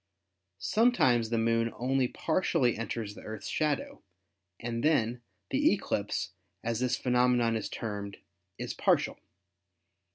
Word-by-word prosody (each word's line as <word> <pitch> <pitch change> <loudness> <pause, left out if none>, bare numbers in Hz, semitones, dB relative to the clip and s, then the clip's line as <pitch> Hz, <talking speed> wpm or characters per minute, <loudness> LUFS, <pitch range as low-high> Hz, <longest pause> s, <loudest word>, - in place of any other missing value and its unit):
Sometimes 125 - +3
the 115 - 0
Moon 115 0 +2
only 130 +1 +1
par 160 +7 0
tially 130 -11 +2
enters 110 -1 -4
the - - -11
Earth's 110 -1 -7
shadow 150 -3 -1 0.6
and 115 0 -3
then 120 -6 +2 0.3
the - - +4
eclipse, - - -1 0.3
as 115 0 -1
this 125 -1 +1
phenomenon 125 -2 +3
is 110 - -3
termed, 100 -3 -5 0.4
is - - -4
partial. - - +1
120 Hz, 125 wpm, -30 LUFS, 115-125 Hz, 0.6 s, the